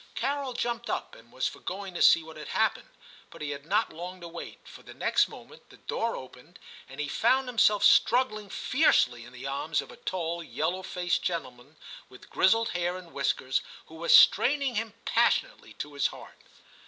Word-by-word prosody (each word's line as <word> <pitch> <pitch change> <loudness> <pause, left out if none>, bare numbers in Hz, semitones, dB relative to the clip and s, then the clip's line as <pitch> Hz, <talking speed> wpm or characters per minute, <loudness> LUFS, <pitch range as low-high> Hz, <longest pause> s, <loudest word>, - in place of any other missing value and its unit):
Carol 275 -2 -2
jumped 235 0 -3
up - - -3
and 115 +1 -16
was 130 - -1
for - - -8
going 195 +1 -6
to 175 - -4
see 165 - +6
what 160 0 -12
had 155 -1 -9
happened; - - 0 0.4
but - - -10
he 145 - -3
had 140 +1 -8
not 210 +4 +1
long 180 +3 -7
to 170 - -7
wait, 170 0 -10
for - - -13
the - - -13
next - - +2
moment 470 - -14
the - - -16
door 230 0 -2
opened, 130 +7 -12 0.3
and 135 - -11
he 150 - -2
found 255 - +2
himself 215 -4 +3
struggling 215 -4 +3
fiercely 125 - +2
in 120 - -13
the 125 +1 -10
arms 140 +3 -1
of 140 - -6
a - - -12
tall 170 -2 -3
yellow 170 +3 -2
faced 180 -1 -1
gentleman, 140 -6 -5 0.3
with 125 - -16
grizzled 225 +4 +3
hair 175 +1 -2
and 180 -2 -13
whiskers, 135 -1 0 0.2
who - - -17
was 165 +1 +4
straining 280 -1 +4
him 225 -1 -3
passionately - - +1
to 145 - -7
his 140 - +1
heart. - - -12
175 Hz, 190 wpm, -28 LUFS, 145-225 Hz, 0.4 s, see